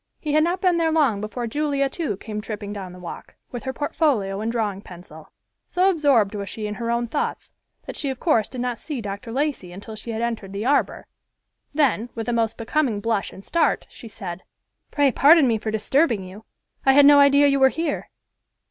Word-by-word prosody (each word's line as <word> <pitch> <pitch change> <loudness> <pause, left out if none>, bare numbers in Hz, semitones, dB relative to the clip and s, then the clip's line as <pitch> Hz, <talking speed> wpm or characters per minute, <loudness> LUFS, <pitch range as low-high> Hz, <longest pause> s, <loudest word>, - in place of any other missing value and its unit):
He 300 -2 -3
had 310 0 +4
not 350 +3 -1
been 360 -2 +3
there 325 -1 +1
long 275 -11 +2
before 225 +3 -4
Julia, 280 +2 0
too, 270 - -3
came 210 0 -6
tripping 210 -1 -6
down 190 -3 -7
the 180 - -12
walk, 175 -2 -9 0.2
with 245 -3 -6
her 265 - -1
portfolio 260 -9 0
and 225 +1 -1
drawing 210 -4 -2
pencil. 170 -5 -13 0.4
So 370 +2 +3
absorbed 275 - +2
was 200 -2 -5
she 215 - -5
in 210 - -3
her 230 +2 -4
own 235 0 0
thoughts 230 - -3 0.3
that - - -7
she 280 - -2
of 260 -1 -4
course 230 - +2
did 255 - -6
not 245 -2 -2
see 295 -5 -5
Dr. 205 +2 -6
Lacey 270 -8 -2
until 205 +4 -9
she 215 +2 -8
had 225 0 -2
entered 220 -5 -3
the 200 +3 -4
arbor; 280 +2 +1 0.7
then, 260 -6 +1
with 225 0 -4
a 240 - 0
most 225 -1 0
becoming 235 -1 0
blush 220 -1 -1
and 195 - -13
start, 335 - +1
she 235 - -11
said, 190 -5 -7 0.5
"Pray 285 -2 +2
pardon 295 +2 +6
me 225 -2 +1
for 215 - -4
disturbing 225 - +1
you. 190 +4 -11 0.4
I 270 - +5
had 285 +1 +7
no 285 0 +8
idea 280 0 +6
you 275 -1 +3
were 265 0 +6
here." 325 +1 -3
235 Hz, 210 wpm, -23 LUFS, 210-285 Hz, 0.7 s, no